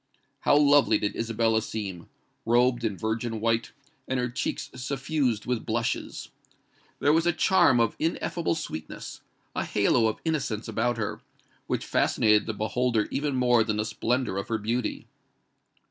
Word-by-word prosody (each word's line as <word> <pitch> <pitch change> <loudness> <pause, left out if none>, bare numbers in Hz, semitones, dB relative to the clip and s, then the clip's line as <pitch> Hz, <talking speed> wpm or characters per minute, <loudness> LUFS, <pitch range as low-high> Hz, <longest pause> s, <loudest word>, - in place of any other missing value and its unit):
How 145 - +4
lovely 145 -6 +5
did 105 - -2
Isabella 115 -1 +1
seem—robed 115 +5 -2
in 105 -4 -1
virgin 110 +3 -2
white, 115 +1 0 0.4
and 130 -1 -1
her 125 0 -1
cheeks 120 - -3
suffused 135 -2 -1
with 125 -3 -1
blushes! 115 0 -2 0.7
There 145 - +3
was 165 +2 +2
a - - +5
charm 170 -5 +4
of 115 -2 +2
ineffable 165 +1 -1
sweetness—a 80 - -7
halo 110 +3 +2
of 110 - -2
innocence 135 -9 -1
about 115 +2 0
her, 110 -3 -3 0.5
which - - -2
fascinated 105 -1 +3
the 110 - -1
beholder 115 +1 0
even 145 -1 -1
more 120 -2 +4
than 105 -1 -2
the 105 - 0
splendour 120 -2 -1
of 100 - -3
her 115 - 0
beauty. 115 +3 -2
115 Hz, 145 wpm, -27 LUFS, 110-130 Hz, 0.7 s, lovely